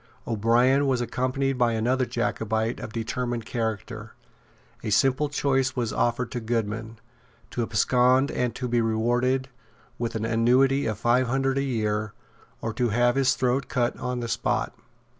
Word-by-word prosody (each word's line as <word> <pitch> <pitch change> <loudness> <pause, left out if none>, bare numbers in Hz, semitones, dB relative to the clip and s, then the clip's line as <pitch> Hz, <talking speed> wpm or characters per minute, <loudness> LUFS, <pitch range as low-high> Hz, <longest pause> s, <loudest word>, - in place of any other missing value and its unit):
O'Brien 120 +5 +3
was 130 -2 +1
accompanied 130 +2 -1
by 120 -1 +3
another 125 +3 +1
Jacobite 110 -1 -1
of - - -7
determined 120 +1 -3
character. 110 -1 -4 0.7
A - - -2
simple 135 +6 +2
choice 135 -2 0
was 120 -4 -1
offered 120 +1 0
to 125 - -3
Goodman, 110 -1 -3 0.5
to 120 - -2
abscond 125 +4 +3
and 125 -2 -1
to 125 - -3
be 120 -1 +1
rewarded 120 +4 +1 0.5
with 120 -1 -3
an 110 0 -2
annuity 125 +5 +3
of 110 -2 -2
five 120 +3 +2
hundred 135 +2 0
a - - +1
year, 110 -4 -1 0.5
or 115 - -3
to 120 +2 0
have 120 +3 +3
his 135 0 +2
throat 130 0 0
cut 125 -2 0
on 125 -1 -3
the 120 - -3
spot. - - -1
120 Hz, 155 wpm, -25 LUFS, 115-130 Hz, 0.7 s, O'Brien